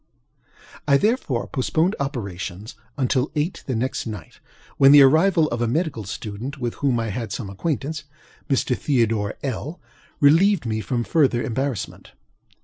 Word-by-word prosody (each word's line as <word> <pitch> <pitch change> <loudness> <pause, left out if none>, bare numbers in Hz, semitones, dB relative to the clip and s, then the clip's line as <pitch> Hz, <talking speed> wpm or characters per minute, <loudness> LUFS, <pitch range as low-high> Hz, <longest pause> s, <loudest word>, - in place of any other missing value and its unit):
I 140 -1 +5
therefore 205 - 0
postponed 160 +8 0
operations 105 -7 -5 0.2
until 130 -1 +1
about - - -19
eight 155 +5 -2
the 130 - -1
next 125 +1 -2
night, 110 -2 -8 0.4
when 135 0 +7
the 145 -1 +9
arrival 160 +4 +4
of 120 0 -3
a 120 - +1
medical 140 - -1
student 110 +8 -6
with 120 -3 -3
whom 135 -4 +2
I 115 -1 -2
had 115 0 -4
some 100 -2 -5
acquaintance, 155 - -3 0.4
(Mr. 135 -2 +1
Theodore 115 -7 0
LŌĆöl,) 140 +5 -4 0.4
relieved 165 +4 +4
me 110 -1 -1
from 120 0 -2
farther 130 -4 +2
embarrassment. 130 -3 -4
130 Hz, 145 wpm, -23 LUFS, 115-150 Hz, 0.4 s, the